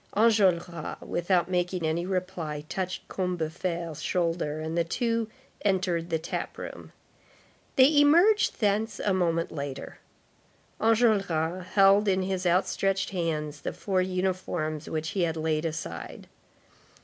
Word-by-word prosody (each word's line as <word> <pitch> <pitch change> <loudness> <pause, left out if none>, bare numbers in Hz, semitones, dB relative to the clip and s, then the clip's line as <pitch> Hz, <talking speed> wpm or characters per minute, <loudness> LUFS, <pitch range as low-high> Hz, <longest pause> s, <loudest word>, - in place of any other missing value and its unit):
Enjolras, 185 -7 +2
without 175 0 0
making 180 -1 -1
any 165 +3 -1
reply, 180 -6 -3
touched 185 +1 -4
Combeferre's 170 -2 -3
shoulder, 165 -3 -1
and 160 +1 -4
the 170 - +2
two 230 +5 -1 0.3
entered 180 -4 0
the 165 - +1
tap 160 - -5
room. - - -8 0.8
They 285 +3 +6
emerged 350 +9 +4
thence 215 +1 0
a 200 - +1
moment 170 -2 0
later. 140 -3 -6 0.8
Enjolras 195 -7 +2
held 200 +1 +5
in 190 -1 +2
his 185 -1 -1
outstretched 190 +2 +1
hands 155 -5 -2
the - - -4
four 190 -2 0
uniforms 180 -4 -2
which 160 0 -2
he 200 -2 -1
had 165 -2 0
laid 155 0 0
aside. 155 - -5
180 Hz, 125 wpm, -27 LUFS, 160-195 Hz, 0.8 s, They